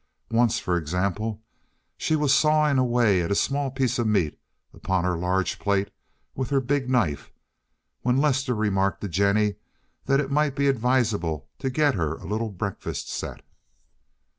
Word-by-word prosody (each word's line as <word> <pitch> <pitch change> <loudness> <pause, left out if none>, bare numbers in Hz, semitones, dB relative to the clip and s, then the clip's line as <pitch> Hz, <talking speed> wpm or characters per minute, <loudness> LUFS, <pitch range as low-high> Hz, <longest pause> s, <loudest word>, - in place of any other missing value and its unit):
Once, 115 0 +3
for 90 -5 0
example, 100 +7 -2 0.5
she 155 - 0
was 150 -3 +2
sawing 150 -1 +3
away 120 -7 +3
at 85 - -2
a - - +2
small 140 +5 0
piece 130 -1 -1
of 120 - +1
meat 95 -8 +1 0.3
upon 95 -2 -1
her 90 -1 0
large 90 +2 -1
plate 100 -1 0 0.4
with 130 -2 -3
her 140 - +2
big 135 0 -1
knife, 105 - 0 0.7
when 125 +1 +1
Lester 135 -3 +1
remarked 100 -2 0
to 105 - -3
Jennie 100 +3 +1 0.5
that 135 +1 +3
it 140 -1 -2
might 150 -1 +1
be 140 0 +1
advisable 115 - 0
to 135 - -1
get 145 +2 +2
her 80 -6 -1
a - - -12
little 110 +4 -2
breakfast 100 0 -5
set. - - -5
115 Hz, 160 wpm, -25 LUFS, 95-135 Hz, 0.7 s, Once